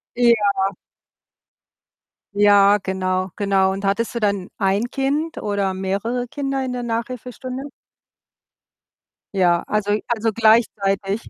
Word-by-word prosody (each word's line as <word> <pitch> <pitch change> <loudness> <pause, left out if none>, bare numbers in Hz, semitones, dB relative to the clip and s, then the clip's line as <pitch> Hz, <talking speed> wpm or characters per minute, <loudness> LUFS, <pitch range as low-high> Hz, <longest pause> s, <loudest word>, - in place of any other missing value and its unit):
Ja. 210 -5 +3 1.6
Ja, 205 0 +5
genau, 185 0 -1
genau. 195 -2 +2
Und 195 +1 -5
hattest 220 +5 0
du 235 - -2
dann 200 -4 -1
1 200 +4 0
Kind 290 +4 -1
oder 200 -2 -1
mehrere 200 +6 -2
Kinder 275 0 -3
in 255 -1 -3
der 245 - -4
Nachhilfestunde? 250 +2 -5 1.7
Ja, 175 -3 +2
also 210 -1 0 0.2
also, 225 -1 0
gleichzeitig. 210 -2 +1
205 Hz, 105 wpm, -21 LUFS, 195-240 Hz, 1.7 s, Ja